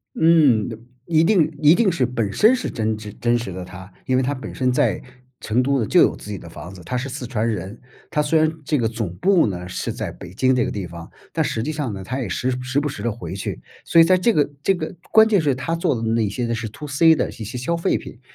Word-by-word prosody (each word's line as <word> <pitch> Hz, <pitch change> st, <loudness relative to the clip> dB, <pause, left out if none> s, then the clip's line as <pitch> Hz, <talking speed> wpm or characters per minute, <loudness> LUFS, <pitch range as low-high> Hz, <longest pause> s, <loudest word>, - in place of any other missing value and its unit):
嗯， 150 Hz, -10 st, +4 dB, 0.4 s
一 160 Hz, -1 st, +3 dB
定 170 Hz, -5 st, +3 dB
一 150 Hz, +3 st, +7 dB
定 215 Hz, -3 st, +3 dB
是 150 Hz, -7 st, 0 dB
本 115 Hz, -5 st, -1 dB
身 220 Hz, -, +5 dB
是 255 Hz, -, -3 dB
真 110 Hz, -2 st, -2 dB
挚、 105 Hz, -1 st, -9 dB
真 120 Hz, 0 st, +2 dB
实 115 Hz, -4 st, -5 dB
的 90 Hz, 0 st, -6 dB
他， 95 Hz, +1 st, -11 dB
因 130 Hz, -, +1 dB
为 -, -, +2 dB
他 140 Hz, +3 st, -1 dB
本 130 Hz, -, -8 dB
身 130 Hz, -1 st, +1 dB
在 125 Hz, -, +1 dB, 0.4 s
成 120 Hz, +4 st, +1 dB
都 135 Hz, 0 st, +1 dB
呢 110 Hz, -, -1 dB
就 -, -, +4 dB
有 -, -, +3 dB
自 105 Hz, -, -10 dB
己 100 Hz, -, -3 dB
的 85 Hz, -, -12 dB
房 85 Hz, +3 st, -9 dB
子， 90 Hz, -, -12 dB
他 125 Hz, +8 st, -2 dB
是 135 Hz, +2 st, -4 dB
四 130 Hz, -1 st, -6 dB
川 115 Hz, -2 st, -1 dB
人。 105 Hz, 0 st, -4 dB, 0.3 s
他 150 Hz, -, 0 dB
虽 150 Hz, +2 st, +2 dB
然 155 Hz, 0 st, +2 dB
这 150 Hz, -, +1 dB
个 120 Hz, -5 st, +1 dB
总 110 Hz, -6 st, -4 dB
部 185 Hz, -, +3 dB
呢 90 Hz, -3 st, -4 dB
是 90 Hz, -, -4 dB
在 -, -, -4 dB
北 -, -, -11 dB
京 130 Hz, +3 st, +2 dB
这 125 Hz, -2 st, +1 dB
个 -, -, -2 dB
地 95 Hz, -3 st, -4 dB
方， 85 Hz, 0 st, -10 dB, 0.2 s
但 -, -, 0 dB
实 110 Hz, -, -2 dB
际 155 Hz, -, -2 dB
上 145 Hz, -8 st, -3 dB
呢， 95 Hz, -1 st, -7 dB
他 130 Hz, +7 st, -3 dB
也 120 Hz, -, -3 dB
时 125 Hz, +8 st, -1 dB
时 130 Hz, +2 st, -1 dB
不 145 Hz, 0 st, 0 dB
时 100 Hz, -, -7 dB
地 120 Hz, -, 0 dB
回 95 Hz, -5 st, -7 dB
去。 100 Hz, -, -5 dB, 0.2 s
所 -, -, +3 dB
以 165 Hz, -, +9 dB
在 185 Hz, +2 st, +4 dB
这 230 Hz, +5 st, +2 dB
个 145 Hz, -1 st, +2 dB
这 195 Hz, -, +3 dB
个 160 Hz, +1 st, -5 dB, 0.2 s
关 220 Hz, 0 st, +7 dB
键 210 Hz, -5 st, +3 dB
是 145 Hz, -3 st, +1 dB
他 130 Hz, +6 st, -3 dB
做 165 Hz, -, 0 dB
的 115 Hz, -, -4 dB
那 115 Hz, -1 st, +1 dB
些 120 Hz, +5 st, -3 dB
呢 115 Hz, 0 st, -1 dB
是 115 Hz, -1 st, -4 dB
2C 150 Hz, +7 st, +3 dB
的 -, -, -1 dB
一 -, -, -13 dB
些 115 Hz, -, -9 dB
些 115 Hz, +5 st, -6 dB
消 130 Hz, +8 st, -1 dB
费 170 Hz, +3 st, +1 dB
品。 120 Hz, -, -9 dB
125 Hz, 300 characters per minute, -21 LUFS, 105-155 Hz, 0.4 s, 以